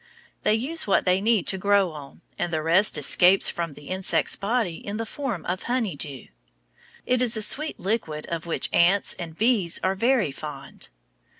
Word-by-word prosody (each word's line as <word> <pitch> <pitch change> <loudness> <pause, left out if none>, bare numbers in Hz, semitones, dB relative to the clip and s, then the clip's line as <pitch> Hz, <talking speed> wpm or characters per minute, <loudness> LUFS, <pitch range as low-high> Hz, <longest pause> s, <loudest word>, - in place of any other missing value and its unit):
They 215 - +3
use 280 +7 -2
what 195 - +2
they 185 +1 +2
need 220 -3 +2
to 190 - -2
grow 200 -2 +3
on, 145 -3 -11
and 175 - -3
the 155 -1 -1
rest 180 +6 +3
escapes 185 +2 +4
from 170 -3 -4
the 145 - -13
insect's 185 0 +1
body 205 -5 -1
in 205 +1 -6
the 225 - -3
form 240 - -5
of 180 +1 -2
"honey 235 - 0
dew." 140 -2 -6 0.8
It 250 0 +2
is 235 -3 +1
a - - 0
sweet 305 +8 -2
liquid 180 -7 -2
of 170 0 -5
which 165 - +1
ants 185 +4 +3
and 165 -2 -7
bees 215 -7 +2
are 190 - +2
very 230 - +1
fond. 140 -1 -7
190 Hz, 185 wpm, -25 LUFS, 165-225 Hz, 0.8 s, escapes